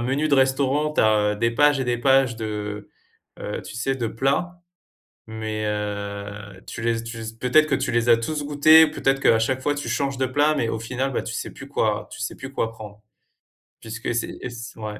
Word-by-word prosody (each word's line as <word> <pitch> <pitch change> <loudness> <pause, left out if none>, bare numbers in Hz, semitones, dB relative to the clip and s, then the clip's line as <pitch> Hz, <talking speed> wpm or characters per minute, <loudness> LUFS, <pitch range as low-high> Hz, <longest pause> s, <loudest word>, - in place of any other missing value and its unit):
menu 135 +6 0
de 145 - +4
restaurant, 135 +3 +2
tu - - +3
as 105 -1 +3
des 115 +3 +1
pages 145 +3 +3
et - - 0
des 120 -1 0
pages 135 -2 +3
de, 105 -2 -5 0.5
heu, - - -4
tu - - -10
sais 135 +3 -1
de 120 -3 -2
plats, 175 +10 -1 0.7
mais, 110 -1 -4
heu, 100 -1 -5
tu - - -7
les 115 0 0
tu 115 0 -7
les 110 - -6
peut-être 155 +6 +4
que 140 - +2
tu 130 -2 -2
les 120 0 +1
as 115 - +7
tous 150 +6 -3
goûté, 155 +2 +7
peut-être 135 -2 0
qu'à 115 - +4
chaque 130 +3 0
fois 145 - +1
tu 145 - -4
changes 140 -1 -1
de 130 - +1
plats, 145 +4 +2
mais 115 - 0
au 115 - -2
final, 130 +3 -2
bah, - - -1
tu - - -6
sais - - -4
plus - - -11
quoi - - -1
tu - - -10
sais - - -3
plus 130 - -8
quoi 115 -4 -1
prendre, 105 -1 -11 0.8
puisque 115 +1 -4
c'est 120 - -1
c'est - - -10
et 125 - -4
c 120 -1 -9
ouais, 105 -1 -6
120 Hz, 225 wpm, -23 LUFS, 110-135 Hz, 0.8 s, as